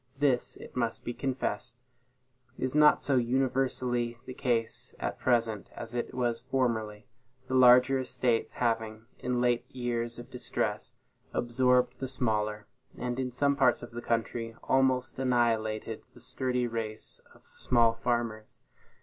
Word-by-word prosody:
This, 135 Hz, -3 st, +2 dB
it -, -, -12 dB
must 120 Hz, -2 st, -1 dB
be 120 Hz, -, -2 dB
confessed, 125 Hz, -4 st, -3 dB, 0.8 s
is 130 Hz, 0 st, -2 dB
not 150 Hz, 0 st, +5 dB
so 140 Hz, -2 st, +2 dB
universally 125 Hz, -1 st, 0 dB
the 130 Hz, -, -7 dB
case 120 Hz, -4 st, -1 dB
at -, -, -3 dB
present 115 Hz, -4 st, +1 dB
as 115 Hz, 0 st, -7 dB
it 120 Hz, -1 st, -3 dB
was 120 Hz, -2 st, 0 dB
formerly; 115 Hz, -5 st, -1 dB, 0.4 s
the 130 Hz, -, -4 dB
larger 130 Hz, +1 st, +7 dB
estates 125 Hz, -2 st, 0 dB
having, 115 Hz, -2 st, -1 dB
in 125 Hz, -1 st, -1 dB
late 120 Hz, -1 st, +2 dB
years 120 Hz, -2 st, -2 dB
of 120 Hz, +2 st, -10 dB
distress, 125 Hz, -, -2 dB, 0.4 s
absorbed 125 Hz, +1 st, +2 dB
the 130 Hz, -, -3 dB
smaller, 105 Hz, -4 st, -1 dB, 0.3 s
and, 125 Hz, +1 st, -3 dB
in 130 Hz, -1 st, -1 dB
some 140 Hz, +3 st, +2 dB
parts 140 Hz, -, +3 dB
of 120 Hz, -, -8 dB
the 120 Hz, +1 st, -6 dB
country, 115 Hz, 0 st, -2 dB
almost 130 Hz, -1 st, +2 dB
annihilated 115 Hz, -4 st, 0 dB
the -, -, -14 dB
sturdy 125 Hz, 0 st, -1 dB
race 115 Hz, -2 st, -4 dB
of -, -, -22 dB
small 115 Hz, -2 st, +3 dB
farmers. 115 Hz, -2 st, -2 dB
120 Hz, 140 wpm, -30 LUFS, 115-130 Hz, 0.8 s, larger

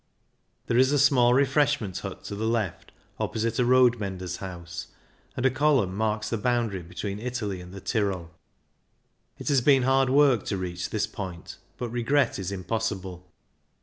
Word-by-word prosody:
There 120 Hz, -, +2 dB
is 130 Hz, +1 st, +5 dB
a 145 Hz, -, +3 dB
small 130 Hz, -4 st, +5 dB
refreshment 140 Hz, -7 st, +2 dB
hut -, -, -7 dB
to -, -, -6 dB
the 110 Hz, +2 st, -2 dB
left, 110 Hz, -6 st, -2 dB, 0.3 s
opposite 115 Hz, +2 st, -1 dB
a 125 Hz, -, +3 dB
road 125 Hz, -1 st, +5 dB
menders' 95 Hz, -3 st, -4 dB
house, 85 Hz, -3 st, -7 dB, 0.5 s
and 130 Hz, -, -1 dB
a 130 Hz, -, +5 dB
column 130 Hz, -9 st, +2 dB
marks 110 Hz, 0 st, -1 dB
the 115 Hz, -, -1 dB
boundary 115 Hz, -5 st, 0 dB
between 100 Hz, +4 st, -5 dB
Italy 110 Hz, -6 st, -3 dB
and 90 Hz, 0 st, -11 dB
the 100 Hz, 0 st, -9 dB
Tyrol. 95 Hz, -7 st, -1 dB, 1.1 s
It -, -, -9 dB
has 140 Hz, -3 st, +4 dB
been 135 Hz, 0 st, +4 dB
hard 135 Hz, 0 st, +3 dB
work 135 Hz, -5 st, +4 dB
to 100 Hz, -, -2 dB
reach 90 Hz, -1 st, -4 dB
this 105 Hz, -1 st, 0 dB
point, 95 Hz, -5 st, -7 dB, 0.2 s
but 120 Hz, -, -4 dB
regret 120 Hz, +1 st, +1 dB
is 95 Hz, 0 st, -3 dB
impossible. 95 Hz, -2 st, -4 dB
110 Hz, 165 wpm, -26 LUFS, 95-130 Hz, 1.1 s, is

